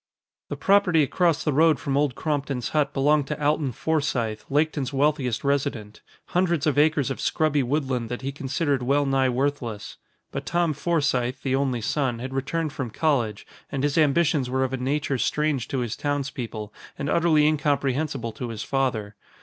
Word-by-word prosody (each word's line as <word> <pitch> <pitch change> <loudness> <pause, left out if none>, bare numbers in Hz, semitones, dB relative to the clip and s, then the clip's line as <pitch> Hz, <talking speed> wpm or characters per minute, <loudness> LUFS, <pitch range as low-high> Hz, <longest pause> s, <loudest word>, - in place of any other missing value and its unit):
The - - -3
property 195 -5 +4
across 170 +2 +1
the 150 - 0
road 160 +1 +4
from 140 -2 -2
Old 140 -3 +1
Crompton's 140 -4 -2
hut 150 -2 +1
belonged 145 +1 +2
to 150 - -4
Alton 150 -2 +1
Forsythe, 125 -6 -1
Laketon's 145 -2 0
wealthiest 135 -4 0
resident 140 -7 -1 0.3
hundreds 175 -4 +1
of 145 -2 +2
acres 150 -3 +3
of - - -4
scrubby 155 -2 +1
woodland 130 -3 -1
that 125 +2 -5
he 135 - -2
considered 140 0 -1
well 140 +3 +2
nigh 135 -1 +2
worthless. 125 -4 -2 0.3
But - - -5
Tom 170 -2 +1
Forsythe, 140 -5 0
the 130 -1 +1
only 135 -3 0
son, 130 +1 0
had 130 +3 -6
returned 145 +3 -2
from 130 -4 -4
college 115 -5 0 0.3
and 135 -1 -2
his 145 -1 +1
ambitions 150 -3 +2
were 130 +1 +1
of 130 0 -2
a - - 0
nature 135 +1 -1
strange 150 -4 0
to 135 -3 -2
his 115 -2 -3
townspeople 130 -7 -4 0.2
and 140 - -3
utterly 160 -2 +3
incomprehensible 140 -4 0
to 120 +2 -6
his 115 -1 -5
father. 115 -7 -1
140 Hz, 170 wpm, -25 LUFS, 130-150 Hz, 0.3 s, property